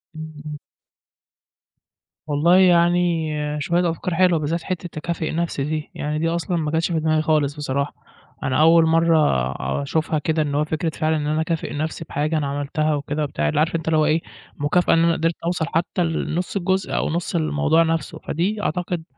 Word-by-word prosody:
إمم، 155 Hz, 0 st, -7 dB
إمم. 150 Hz, 0 st, -6 dB, 1.7 s
والله 155 Hz, +5 st, +4 dB
يعني 175 Hz, -2 st, +3 dB, 0.3 s
شوية 175 Hz, +3 st, +1 dB
أفكار 170 Hz, +2 st, -3 dB
حلوة، 180 Hz, -2 st, +4 dB
بالذات 160 Hz, +3 st, -2 dB
حتة 180 Hz, -1 st, -4 dB
تكافئ 160 Hz, +1 st, -3 dB
نَفسي 165 Hz, -4 st, -2 dB
دي 155 Hz, +1 st, -3 dB
يعني 150 Hz, +1 st, -2 dB
دي 165 Hz, -, 0 dB
أصلًا 170 Hz, +1 st, -1 dB
ما 150 Hz, -2 st, -1 dB
جتش 165 Hz, +2 st, 0 dB
في 160 Hz, -, +1 dB
دماغي 155 Hz, 0 st, +1 dB
خالص 150 Hz, -2 st, +1 dB
بصراحة، 140 Hz, -1 st, -2 dB, 0.5 s
أنا 130 Hz, +3 st, +1 dB
أول 165 Hz, +1 st, +6 dB
مَرّة 165 Hz, 0 st, +3 dB, 0.7 s
أشوفها 155 Hz, +2 st, -1 dB
كده 160 Hz, +1 st, 0 dB
إن 145 Hz, -2 st, -1 dB
هو 150 Hz, -, +2 dB
فكرة 160 Hz, +2 st, -2 dB
فعلًا 155 Hz, 0 st, 0 dB
إن 150 Hz, -1 st, -2 dB
أنا 155 Hz, +1 st, +1 dB
اكافئ 165 Hz, -1 st, -2 dB
نَفسي 155 Hz, +2 st, -3 dB
بحاجة 150 Hz, +3 st, -1 dB
أنا 145 Hz, -2 st, -1 dB
عملتها 145 Hz, +2 st, -1 dB
وكده 145 Hz, +1 st, -2 dB
وبتاع 75 Hz, -, -1 dB
اللي -, -, 0 dB
عارف 165 Hz, +2 st, +1 dB
أنت 160 Hz, -1 st, -3 dB
اللي 160 Hz, -1 st, +3 dB
هو 155 Hz, -, +3 dB
إيه، 155 Hz, +2 st, +2 dB, 0.4 s
مكافأة 145 Hz, +5 st, +2 dB
إن 165 Hz, -, +4 dB
أنا 170 Hz, 0 st, +3 dB
قدرت 165 Hz, +1 st, 0 dB
اوصل 170 Hz, -1 st, 0 dB
حتى 175 Hz, +2 st, 0 dB
لنُص 165 Hz, +2 st, -2 dB
الجزء 190 Hz, 0 st, 0 dB
أو -, -, 0 dB
نُص 170 Hz, +2 st, -2 dB
الموضوع 160 Hz, 0 st, +2 dB
نَفسه، 165 Hz, -3 st, -2 dB
فدي 200 Hz, +7 st, -2 dB
أعتقد 175 Hz, -2 st, -2 dB
160 Hz, 185 wpm, -22 LUFS, 150-170 Hz, 1.7 s, أول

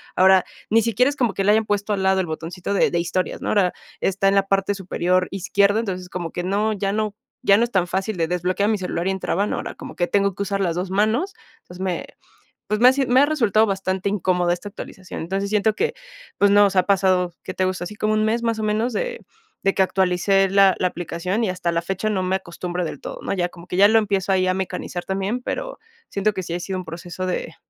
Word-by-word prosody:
ahora, 190 Hz, 0 st, +5 dB, 0.2 s
ni 225 Hz, 0 st, +4 dB
siquiera 235 Hz, +4 st, +2 dB
es 290 Hz, -, -4 dB
como 240 Hz, -8 st, +1 dB
que 195 Hz, -, -1 dB
le 205 Hz, -, +4 dB
hayan 220 Hz, 0 st, +3 dB
puesto 205 Hz, 0 st, -1 dB
al 190 Hz, -1 st, -1 dB
lado 190 Hz, 0 st, +3 dB
el 175 Hz, -, -4 dB
botoncito 170 Hz, +5 st, -4 dB
de -, -, +3 dB
de 170 Hz, -, +1 dB
historias, 175 Hz, +2 st, -2 dB
¿no?, -, -, -3 dB
ahora, 190 Hz, -4 st, +2 dB, 0.3 s
está 195 Hz, +1 st, +1 dB
en 195 Hz, -, +3 dB
la 195 Hz, -, +4 dB
parte 195 Hz, +1 st, +1 dB
superior 180 Hz, -1 st, 0 dB
izquierda, 200 Hz, +2 st, +2 dB
entonces, 185 Hz, -5 st, -4 dB
como 175 Hz, -2 st, -5 dB
que 175 Hz, -, -4 dB
no 205 Hz, +3 st, 0 dB
ya 200 Hz, 0 st, -1 dB
no 215 Hz, -1 st, -1 dB, 0.3 s
ya 200 Hz, -5 st, +5 dB
no 235 Hz, -, +3 dB
es 240 Hz, -, -2 dB
tan 180 Hz, -2 st, +1 dB
fácil 195 Hz, +4 st, -2 dB
de 165 Hz, -1 st, +1 dB
desbloquear 180 Hz, +4 st, 0 dB
mi 215 Hz, -, +2 dB
celular 180 Hz, -1 st, -3 dB
y -, -, +2 dB
entraban, 190 Hz, +1 st, -1 dB
ahora -, -, -4 dB
como -, -, -9 dB
que 175 Hz, -, +1 dB
tengo 200 Hz, -2 st, +1 dB
que 200 Hz, -, -2 dB
usar 195 Hz, 0 st, -2 dB
las 170 Hz, -3 st, 0 dB
2 180 Hz, +1 st, -3 dB
manos, 220 Hz, -, +1 dB, 0.3 s
entonces, 180 Hz, +1 st, -11 dB
me, 180 Hz, -2 st, -2 dB, 0.6 s
pues, 210 Hz, +1 st, 0 dB
me 245 Hz, -, +7 dB
ha 260 Hz, -, +3 dB
me 250 Hz, +2 st, +5 dB
ha 290 Hz, -, +4 dB
resultado 225 Hz, -8 st, +3 dB
bastante 190 Hz, 0 st, -1 dB
incómoda 180 Hz, -3 st, +1 dB
esta 190 Hz, +4 st, -6 dB
actualización, 190 Hz, -2 st, -8 dB
entonces, 195 Hz, +4 st, -3 dB
siento 215 Hz, 0 st, +2 dB
que, 465 Hz, -, 0 dB, 0.5 s
pues, 200 Hz, -, +5 dB
no, 205 Hz, 0 st, +6 dB
o -, -, +3 dB
sea, 185 Hz, -2 st, +3 dB
pasado, 185 Hz, -3 st, +2 dB
¿qué 185 Hz, -, -6 dB
te 185 Hz, -, 0 dB
gusta?, 185 Hz, -1 st, -2 dB
así 180 Hz, -, -6 dB
como 215 Hz, 0 st, 0 dB
un 215 Hz, 0 st, +2 dB
mes 230 Hz, +2 st, +1 dB
más 230 Hz, -1 st, 0 dB
o 215 Hz, -, -3 dB
menos 215 Hz, +3 st, 0 dB
de -, -, -3 dB, 0.4 s
de 195 Hz, -, +3 dB
que 195 Hz, -, +1 dB
actualicé 190 Hz, +1 st, +2 dB
la 195 Hz, -1 st, +5 dB
la 185 Hz, -, +2 dB
aplicación, 180 Hz, +5 st, -3 dB
y 200 Hz, -, +1 dB
hasta 175 Hz, -2 st, -1 dB
la 170 Hz, 0 st, 0 dB
fecha 190 Hz, +4 st, -2 dB
no 190 Hz, -2 st, 0 dB
me 185 Hz, +1 st, 0 dB
acostumbro 175 Hz, 0 st, -5 dB
del -, -, -6 dB
todo, -, -, -7 dB
¿no?, -, -, -2 dB
ya 175 Hz, -2 st, 0 dB
como 175 Hz, 0 st, -13 dB
que -, -, -4 dB
ya 200 Hz, +1 st, +8 dB
lo 225 Hz, -, +4 dB
empiezo 195 Hz, -3 st, 0 dB
ahí 185 Hz, -1 st, +3 dB
a 185 Hz, -, +2 dB
mecanizar 185 Hz, -1 st, -4 dB
también, 195 Hz, +5 st, -2 dB
pero -, -, -4 dB, 0.3 s
siento 200 Hz, +2 st, +1 dB
que 190 Hz, -1 st, -4 dB
sí 170 Hz, -, -5 dB
ha 175 Hz, -, -2 dB
sido 190 Hz, +1 st, -4 dB
un 185 Hz, -, -7 dB
proceso 175 Hz, +2 st, -6 dB
de 180 Hz, -2 st, -3 dB
195 Hz, 250 wpm, -22 LUFS, 180-210 Hz, 0.6 s, ya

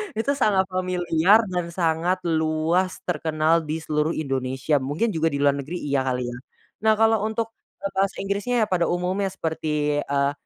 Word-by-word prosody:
itu 225 Hz, +6 st, 0 dB
sangat 210 Hz, -9 st, +2 dB
familiar 185 Hz, +2 st, +3 dB
dan 175 Hz, -1 st, -1 dB
sangat 170 Hz, +1 st, 0 dB
luas 160 Hz, +2 st, +1 dB
terkenal 160 Hz, -1 st, +1 dB
di 155 Hz, -, -1 dB
seluruh 150 Hz, +1 st, 0 dB
Indonesia, 135 Hz, 0 st, -1 dB
mungkin 150 Hz, -, -1 dB
juga 165 Hz, -1 st, +1 dB
di 145 Hz, -, -1 dB
luar 140 Hz, -, +5 dB
negeri 160 Hz, +6 st, -5 dB
iya 140 Hz, -2 st, 0 dB
kali 125 Hz, -1 st, -1 dB
ya, 120 Hz, -, -7 dB, 0.4 s
nah 220 Hz, +1 st, +3 dB
kalau 220 Hz, -1 st, +3 dB
untuk, 225 Hz, +1 st, -2 dB, 0.3 s
eee, 195 Hz, -, -2 dB
bahasa 195 Hz, 0 st, 0 dB
Inggrisnya 205 Hz, +4 st, 0 dB
pada 175 Hz, -2 st, +2 dB
umumnya 185 Hz, +3 st, 0 dB
seperti, 150 Hz, -4 st, -1 dB
eee, 140 Hz, -1 st, 0 dB
170 Hz, 160 wpm, -24 LUFS, 150-195 Hz, 0.4 s, luar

